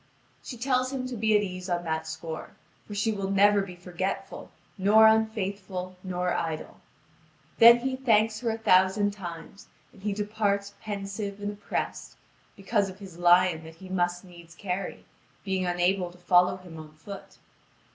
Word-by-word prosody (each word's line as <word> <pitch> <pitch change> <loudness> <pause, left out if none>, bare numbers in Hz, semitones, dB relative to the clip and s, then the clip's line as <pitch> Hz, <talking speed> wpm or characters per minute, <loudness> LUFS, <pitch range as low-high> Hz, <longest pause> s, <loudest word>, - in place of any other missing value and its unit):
She 245 - -8
tells 255 +1 0
him 260 -2 -3
to 250 - -5
be 215 -1 +3
at 205 - 0
ease 185 -1 -6
on 175 -1 -1
that 160 -1 -2
score; 160 0 -7 0.3
for 205 - -7
she 210 +2 +1
will 195 -2 -3
never 200 +1 +5
be 190 -2 -7
forgetful, 180 +2 -5 0.3
nor 210 +3 +6
unfaithful, 200 -4 0
nor 180 -1 -1
idle. 160 -2 -4 0.8
Then 235 +1 +10
he 260 +1 -1
thanks 220 -4 +2
her 235 - -1
a 225 - -1
thousand 190 0 +3
times, 180 -1 -9 0.3
and 200 - -17
he 205 +1 -1
departs 205 -1 -1
pensive 200 -1 -5
and 205 0 -3
oppressed, 205 0 -5 0.4
because 200 0 0
of 190 - -10
his 190 -4 -11
lion 175 -1 +4
that 160 0 -11
he 185 +3 -12
must 175 -1 -1
needs 170 -2 -14
carry, 185 +2 -4 0.4
being 190 -2 -1
unable 180 +1 +1
to 180 - -17
follow 180 +1 +3
him 175 -3 -11
on 155 -1 -11
foot. 195 +6 -11
195 Hz, 165 wpm, -27 LUFS, 180-210 Hz, 0.8 s, Then